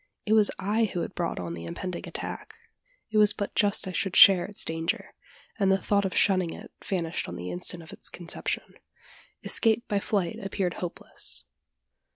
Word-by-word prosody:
It 215 - +2
was 215 -2 +7
I 210 +4 +1
who 180 -4 -3
had - - -4
brought 170 -2 -2
on 85 -2 -4
the 85 0 -7
impending 175 - -5
attack. - - -6 0.6
It 215 - +3
was 210 -1 +6
but 200 - -4
just 205 -1 +2
I - - -3
should 190 0 -1
share 190 -3 +9
its 205 - -3
danger; 165 0 -2 0.5
and 195 -1 +3
the 190 - +4
thought 200 0 +1
of 190 - -2
shunning 185 -4 +3
it - - -11
vanished 170 -4 -2
on 85 - -6
the 90 0 -5
instant 165 - -2
of 160 - -12
its - - -5
conception. 170 -2 -4 0.7
Escape 225 +1 +2
by 205 -2 +1
flight 195 -4 -1
appeared 195 -2 -2
hopeless. 175 -2 -5
190 Hz, 185 wpm, -27 LUFS, 170-205 Hz, 0.7 s, share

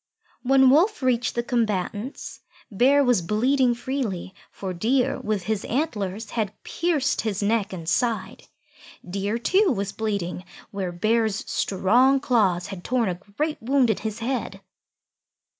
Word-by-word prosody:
When 265 0 +5
Wolf 340 +3 +3
reached 250 -1 +1
the 235 - 0
combatants, 220 0 -2 0.3
Bear 270 +8 +4
was 245 -7 +3
bleeding 245 +7 +2
freely, 235 -8 -4 0.2
for 190 -2 -6
Deer 245 +8 +1
with 210 -3 -2
his 215 +1 -2
antlers 220 - -2
had 215 -4 -2
pierced 305 -5 0
his 210 -2 -2
neck 215 0 +1
and 170 -4 -7
side. 230 +5 -1 0.6
Deer, 200 +4 -2
too, 375 - +3
was 200 -4 -2
bleeding 200 -5 -3 0.3
where 195 -4 -3
Bear's 215 +3 0
strong 245 +8 +3
claws 200 -10 +1
had 195 -3 -8
torn 240 -4 0
a 175 -1 -4 0.2
great 305 0 -1
wound 255 0 +3
in 215 - -1
his 215 0 -4
head. 230 -5 -3
225 Hz, 140 wpm, -24 LUFS, 195-260 Hz, 0.6 s, When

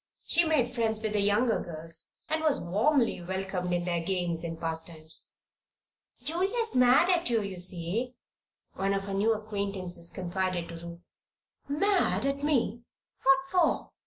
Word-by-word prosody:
She 340 - +4
made 280 -7 +1
friends 220 -2 0
with 215 -1 -1
the 205 - +2
younger 210 +4 +2
girls 165 0 -3
and 315 +1 -1
was 310 -3 +3
warmly 225 - +1
welcomed 185 0 -3
in 175 0 0
their 175 -1 0
games 175 -2 -1
and 165 -1 -5
pastimes. 160 -1 -2 0.9
"Julia's 395 +9 +1
mad 250 +6 +6
at 345 -5 +1
you, 225 -3 +2
you 195 -2 -5
see," 185 +8 -2 0.6
one 195 +1 0
of 195 - -2
her 195 0 -5
new 205 +3 +2
acquaintances 200 -5 -4
confided 180 -1 -2
to 170 - -7
Ruth. 170 +1 -10 0.6
"Mad 370 +3 +2
at 275 +1 -1
me? 240 -6 +1 0.4
What 270 0 +6
for?" 360 -3 +2
200 Hz, 150 wpm, -29 LUFS, 175-260 Hz, 0.9 s, mad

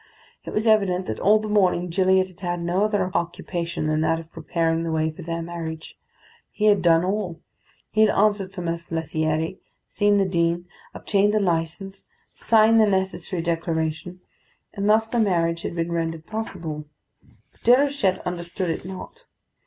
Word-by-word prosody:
It - - -5
was 215 +2 -1
evident 195 -5 +3
that 110 - -4
all 210 +2 +5
the 215 0 -4
morning 185 -4 +2
Gilliatt 190 +1 +3
had 185 -1 -18
had 175 -2 -2
no 180 +4 +1
other 200 -4 0
occupation 170 -1 -3
than 155 0 +1
that 165 +1 +1
of 165 0 -12
preparing 165 -1 -1
the 165 -1 -2
way 160 0 0
for 155 - -11
their 165 0 -4
marriage: 165 -2 -6 0.5
he 210 - -2
had 205 -2 +5
done 170 0 +4
all: 185 -4 -2 0.5
he 215 - +2
had 215 - +6
answered 205 -2 +2
for 195 -2 -7
Mess 170 0 -4
Lethierry, 160 +1 -1 0.3
seen 205 0 +2
the 195 - +3
Dean, 170 -1 0 0.3
obtained 205 +1 +1
the - - +4
licence, 185 +2 -2 0.3
signed 225 0 +4
the 215 - +5
necessary 190 -2 -1
declaration; 165 +1 -2 0.5
and 205 -1 -1
thus 220 +1 +4
the 235 +1 -2
marriage 170 -5 +1
had - - -5
been 170 0 -2
rendered 165 -1 -2
possible. 170 -9 -5 0.7
But - - -32
Déruchette 250 -6 +3
understood 175 0 -3
it - - -4
not. 190 - -9
180 Hz, 170 wpm, -24 LUFS, 165-205 Hz, 0.7 s, had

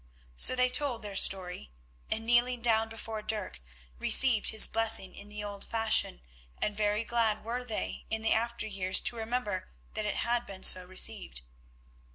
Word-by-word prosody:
So 255 - +5
they 250 0 +1
told 250 -4 +1
their 205 -1 -8
story, 180 - 0 0.4
and 225 +1 -3
kneeling 240 +1 +1
down 225 -1 +1
before 225 -1 -7
Dirk, 210 - -4 0.4
received 245 - +4
his 220 - +5
blessing 225 -3 +2
in 205 - -11
the 210 0 -7
old 205 -1 -7
fashion, 225 - +2 0.4
and 210 - -2
very 210 +1 -1
glad 225 -2 -1
were 240 +3 -4
they 225 -4 -6
in 220 0 -3
the 225 - +2
after 235 +1 -2
years 190 -3 0
to - - -3
remember 220 -5 -4 0.2
that 215 -1 -4
it - - -3
had 240 0 -2
been 190 -1 -11
so 185 -1 +7
received. 185 - -2
220 Hz, 170 wpm, -29 LUFS, 205-235 Hz, 0.4 s, so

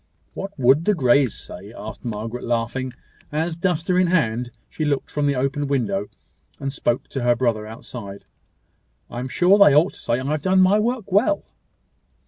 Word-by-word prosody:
"What 195 -1 -7
would 135 +5 +4
the 210 - +3
Greys 130 - +3
say?" - - -10
asked - - -8
Margaret, 115 +1 -5
laughing; 120 +2 -2 0.4
as, 160 +2 -1
duster 180 +1 0
in 185 - +3
hand, 125 -9 +1 0.2
she 155 - -5
looked 145 -2 -1
from 145 -1 0
the 140 - +1
open 135 +2 -1
window, 105 -8 -1 0.5
and 135 -1 -3
spoke 120 -2 -1
to 135 - -4
her 120 0 +3
brother 115 -4 0
outside. 110 -3 -9 0.9
"I 120 - -5
am 125 - -4
sure 185 +8 +4
they 175 -9 +7
ought 160 +6 +4
to - - -14
say 120 +1 -1
I 130 - -5
have 150 +1 -1
done 190 0 +3
my 190 +3 +5
work 225 -2 -2
well." 250 +11 +2
140 Hz, 180 wpm, -22 LUFS, 120-175 Hz, 0.9 s, they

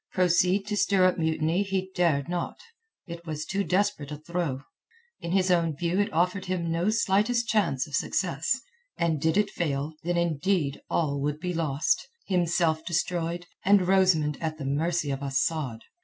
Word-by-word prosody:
Proceed 180 +2 +3
to 210 0 -2
stir 195 -2 +3
up 185 -1 +2
mutiny 160 +2 +1
he 190 -1 -2
dared 160 -6 +1
not. 175 0 -3 0.5
It 170 -1 -8
was 155 -1 -4
too 195 +4 -1
desperate 180 -7 0
a 150 - -4
throw. 155 -4 -3 0.6
In 170 - -5
his 185 0 +2
own 165 -3 +2
view 175 +5 -1
it 205 - +1
offered 180 +4 0
him 175 -3 -2
no 170 +4 +1
slightest 225 +2 +2
chance 190 - +1
of 150 - -14
success, 170 - 0 0.4
and 160 -4 0
did 160 +3 +2
it 210 -1 +2
fail, 145 -2 -2
then 175 +1 -1
indeed 170 -2 0
all 145 -4 0
would 145 +1 -1
be 180 +1 -3
lost, 160 - 0 0.2
himself 170 -3 +1
destroyed, 170 0 -1 0.2
and 195 -2 +4
Rosamund 180 -6 +3
at 160 -1 -2
the 145 - -6
mercy 155 +2 0
of 135 0 -3
Asad. 140 -3 -1
170 Hz, 170 wpm, -27 LUFS, 155-185 Hz, 0.6 s, and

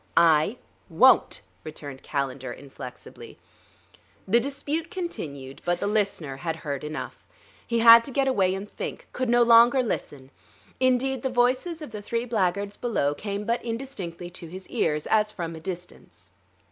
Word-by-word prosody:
"I 165 +7 +4 0.3
won't," - - +4 0.2
returned 145 -3 -8
Calendar 135 -2 -3
inflexibly. 135 -2 -11 0.9
The 230 +5 +4
dispute 285 +5 -3
continued, 140 - -6
but 175 0 0
the - - -2
listener 200 -9 -1
had 165 +2 -3
heard 145 -4 -5
enough. 155 +1 -6 0.4
He 235 - 0
had 230 0 +9
to - - -5
get 270 +1 +1
away 190 -8 +2
and 195 +2 -6
think, - - -7
could 255 -2 -2
no 240 0 +5
longer 235 +2 +6
listen; 140 - -5 0.5
indeed, 255 0 +2
the 265 - -1
voices 255 +7 +1
of 295 - -9
the 210 -1 -6
three 230 +3 -2
blackguards 200 -3 -1
below 180 -12 0
came 200 +6 -4
but 235 +2 -1
indistinctly 225 -8 -5
to 175 -1 -9
his 185 +3 -8
ears, 150 - 0
as 215 -1 +2
if - - -14
from 165 -2 -4
a - - -8
distance. 180 +1 -9
205 Hz, 160 wpm, -26 LUFS, 160-245 Hz, 0.9 s, had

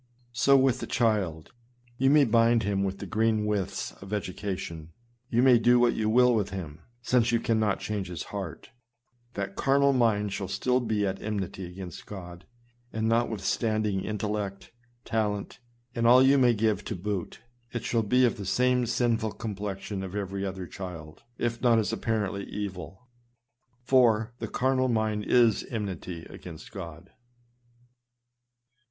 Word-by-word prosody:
So 140 +2 +5
with 130 -2 +3
the - - -5
child; 100 -10 0 0.5
you 135 +1 +4
may 145 0 +6
bind 115 0 +3
him 100 -1 0
with 95 0 -2
the - - -7
green 110 -1 +1
withes 105 -3 -2
of 100 0 -10
education, 90 -5 -4 0.4
you 120 +2 +2
may 125 -3 +6
do 120 +2 +5
what 120 -1 +4
you 110 -1 0
will 125 +2 +5
with 105 -3 0
him, 85 -5 -7 0.2
since 120 -2 +2
you 115 - +2
cannot 110 -3 +1
change 100 -3 -3
Ms 85 -4 -5
heart, 95 -5 -6 0.6
that 95 -1 -4
car 135 0 +2
nal 140 0 +4
mind 105 -5 +2
shall 95 - -3
still 125 +6 +1
be 110 -4 0
at 95 0 -3
enmity 95 -3 -4
against 90 -1 -9
God; 90 -2 -9 0.4
and 110 0 -1
notwithstanding 110 -2 0
intellect, 105 -2 -4 0.3
talent, 105 -3 -2 0.3
and 115 -1 +1
all 125 +2 +8
you 135 +1 +5
may 120 -2 +4
give 105 -2 +1
to 110 - -3
boot, 95 0 -4 0.3
it 120 -2 -4
shall 115 -1 +1
be 125 +4 +3
of 120 - 0
the 100 - -6
same 125 +3 +2
sinful 115 -2 0
complexion 100 -2 -5
as 95 0 -6
every 100 -1 -3
other 95 -1 -4
child, 85 -4 -8 0.2
if 120 0 -2
not 120 -2 +4
as 110 0 0
apparently 105 -3 -1
evil; 95 +2 -7 0.8
for 115 -4 +3
" - - -38
the - - -3
carnal 130 0 +1
mind 110 -3 0
is 120 -3 +4
enmity 95 -6 -5
against 80 -3 -11
God." 85 -1 -9
105 Hz, 160 wpm, -28 LUFS, 95-120 Hz, 0.8 s, all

